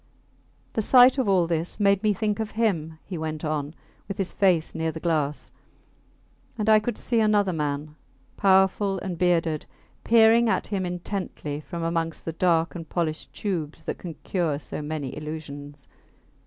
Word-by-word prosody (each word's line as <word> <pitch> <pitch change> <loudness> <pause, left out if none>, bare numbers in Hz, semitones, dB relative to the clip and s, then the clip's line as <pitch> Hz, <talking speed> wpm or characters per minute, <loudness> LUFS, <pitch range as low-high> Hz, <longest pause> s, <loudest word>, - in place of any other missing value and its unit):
The 220 - 0
sight 250 +4 +6
of 250 - +1
all 185 -3 +4
this 165 +3 -2
made 200 -1 +3
me 215 -1 +3
think 210 +1 -1
of 220 -1 -2
him, 175 -9 -1
he 180 -4 -5
went 155 0 -4
on, 155 0 -2 0.3
with 195 - -5
his 195 -2 -2
face 180 -5 +2
near 160 0 -1
the 160 - -7
glass... 155 -4 -1 1.1
and 215 -1 -2
I 215 -1 +7
could 235 +3 -3
see 235 -2 +1
another 205 -3 +3
man, 150 -1 -3 0.4
powerful 190 0 +3
and 185 -1 -4
bearded, 165 -3 +1 0.4
peering 230 0 +5
at - - +1
him 190 -3 -2
intently 175 -4 -4
from 170 +1 -6
amongst 165 -1 -2
the 165 - -3
dark 165 -1 +2
and 165 -3 -8
polished 160 -3 -2
tubes 165 -7 -4
that - - -4
can 170 -3 -7
cure 170 -6 0
so 150 - -6
many 150 -3 -4
illusions. 145 -2 -8
175 Hz, 165 wpm, -25 LUFS, 155-200 Hz, 1.1 s, I